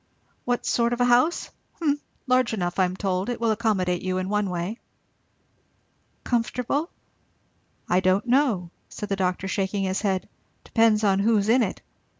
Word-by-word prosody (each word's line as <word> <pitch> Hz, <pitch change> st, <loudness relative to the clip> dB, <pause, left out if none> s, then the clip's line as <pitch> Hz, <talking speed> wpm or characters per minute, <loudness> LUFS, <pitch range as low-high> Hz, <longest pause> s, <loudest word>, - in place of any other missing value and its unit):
"What 245 Hz, 0 st, -1 dB
sort 235 Hz, 0 st, +1 dB
of 240 Hz, -, -3 dB
a -, -, +5 dB
house? 250 Hz, +8 st, +2 dB, 0.2 s
Humph 295 Hz, -3 st, 0 dB, 0.3 s
Large 255 Hz, -3 st, +2 dB
enough, 175 Hz, -2 st, -2 dB
I 185 Hz, -, +5 dB
am 180 Hz, 0 st, -3 dB
told. 190 Hz, +1 st, -1 dB
It 245 Hz, -, -3 dB
will 230 Hz, -1 st, +2 dB
accommodate 200 Hz, -5 st, 0 dB
you, 185 Hz, 0 st, -2 dB
in 185 Hz, 0 st, -2 dB
one 210 Hz, -1 st, 0 dB
way." 180 Hz, +6 st, -3 dB, 1.4 s
"Comfortable?" 250 Hz, +6 st, -1 dB, 1.0 s
"I 180 Hz, -, +3 dB
don't 185 Hz, +3 st, +2 dB
know," 240 Hz, -9 st, +1 dB, 0.2 s
said 210 Hz, -, -7 dB
the 195 Hz, -, +1 dB
doctor 185 Hz, 0 st, -1 dB
shaking 195 Hz, +1 st, -1 dB
his 190 Hz, 0 st, -1 dB
head; 190 Hz, -3 st, -1 dB, 0.4 s
"depends 225 Hz, -2 st, +3 dB
on 195 Hz, -2 st, +3 dB
who's 210 Hz, 0 st, +2 dB
in 250 Hz, +3 st, +5 dB
it. 200 Hz, -5 st, -2 dB
210 Hz, 160 wpm, -25 LUFS, 185-240 Hz, 1.4 s, a